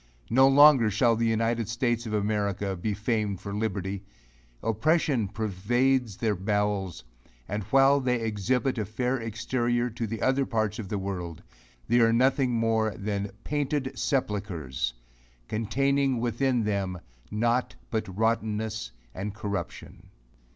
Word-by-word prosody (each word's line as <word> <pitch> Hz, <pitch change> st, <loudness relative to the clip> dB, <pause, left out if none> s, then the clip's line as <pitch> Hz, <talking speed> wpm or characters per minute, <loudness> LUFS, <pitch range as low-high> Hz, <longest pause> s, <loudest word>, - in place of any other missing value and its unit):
No 130 Hz, +3 st, +6 dB
longer 135 Hz, -4 st, +7 dB
shall 115 Hz, +3 st, +3 dB
the 115 Hz, +1 st, +1 dB
united 115 Hz, 0 st, 0 dB
states 120 Hz, 0 st, 0 dB
of 110 Hz, -, -4 dB
America 100 Hz, -2 st, -1 dB
be 100 Hz, +4 st, -2 dB
famed 105 Hz, -3 st, -1 dB
for 100 Hz, +1 st, -6 dB
liberty. 100 Hz, -2 st, -2 dB, 0.6 s
Oppression 120 Hz, +1 st, +1 dB
pervades 110 Hz, +3 st, 0 dB
their 110 Hz, -3 st, +1 dB
bowels; 100 Hz, -3 st, -1 dB, 0.4 s
and 105 Hz, +2 st, -2 dB
while 135 Hz, +5 st, +5 dB
they 125 Hz, -2 st, 0 dB
exhibit 115 Hz, +4 st, 0 dB
a 105 Hz, -, -1 dB
fair 125 Hz, +5 st, -1 dB
exterior 120 Hz, +2 st, -1 dB
to 115 Hz, 0 st, -3 dB
the 115 Hz, +1 st, -4 dB
other 130 Hz, +1 st, +3 dB
parts 110 Hz, -3 st, -1 dB
of 100 Hz, -4 st, -6 dB
the 105 Hz, -, -1 dB
world, 90 Hz, -4 st, -5 dB, 0.4 s
they 120 Hz, +1 st, +4 dB
are 115 Hz, -1 st, +5 dB
nothing 130 Hz, +2 st, +3 dB
more 110 Hz, -2 st, +1 dB
than 100 Hz, 0 st, -2 dB
"painted 145 Hz, -2 st, -1 dB
sepulchres," 95 Hz, -, -2 dB, 0.5 s
containing 135 Hz, +4 st, +1 dB
within 120 Hz, +1 st, +1 dB
them 100 Hz, -4 st, -1 dB, 0.3 s
nought 120 Hz, +4 st, 0 dB, 0.2 s
but 110 Hz, -1 st, -1 dB
rottenness 110 Hz, -1 st, -1 dB, 0.2 s
and 100 Hz, +2 st, -5 dB
corruption. 100 Hz, -2 st, -6 dB
110 Hz, 130 wpm, -27 LUFS, 105-125 Hz, 0.6 s, longer